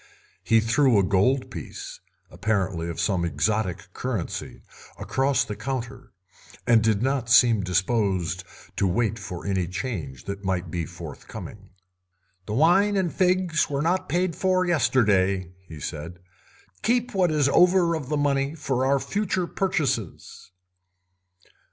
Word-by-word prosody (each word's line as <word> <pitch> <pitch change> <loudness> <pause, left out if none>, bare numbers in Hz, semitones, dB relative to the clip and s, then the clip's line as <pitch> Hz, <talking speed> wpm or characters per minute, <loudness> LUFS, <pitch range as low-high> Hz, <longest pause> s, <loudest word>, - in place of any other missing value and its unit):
He 115 -1 +4
threw 120 +1 +3
a 100 - +4
gold 100 +9 +1
piece, - - -8 0.3
apparently 95 -3 -1
of 85 - -6
some 90 +1 +1
exotic 90 +3 -1
currency, 115 -9 -4 0.3
across 135 +1 +1
the 105 - -5
counter, 130 0 -5 0.5
and 115 -2 +5
did 110 -1 +1
not 130 -3 0
seem 115 -3 +6
disposed 95 -1 0 0.3
to 100 - +2
wait 110 +4 0
for 90 -4 -7
any 95 -3 0
change 90 - -5
that 100 0 -6
might 90 -3 -2
be 85 -2 -3
forthcoming. 85 +4 -10 0.8
"The 105 - -3
wine 195 - +4
and 180 -4 0
figs 180 -3 +1
were 140 0 -1
not 180 +3 0
paid 180 -1 0
for 185 -1 +1
yesterday," 100 - +2 0.2
he 80 -2 -10
said; 80 +4 -6 0.6
"keep 245 +1 +1
what 185 -3 +2
is 150 -3 +2
over 180 +1 +4
of 150 -5 -4
the 150 - 0
money 140 0 0
for 130 -5 -1
our 140 +1 +3
future 190 +1 -1
purchases." 155 - -2
115 Hz, 135 wpm, -25 LUFS, 95-150 Hz, 0.8 s, seem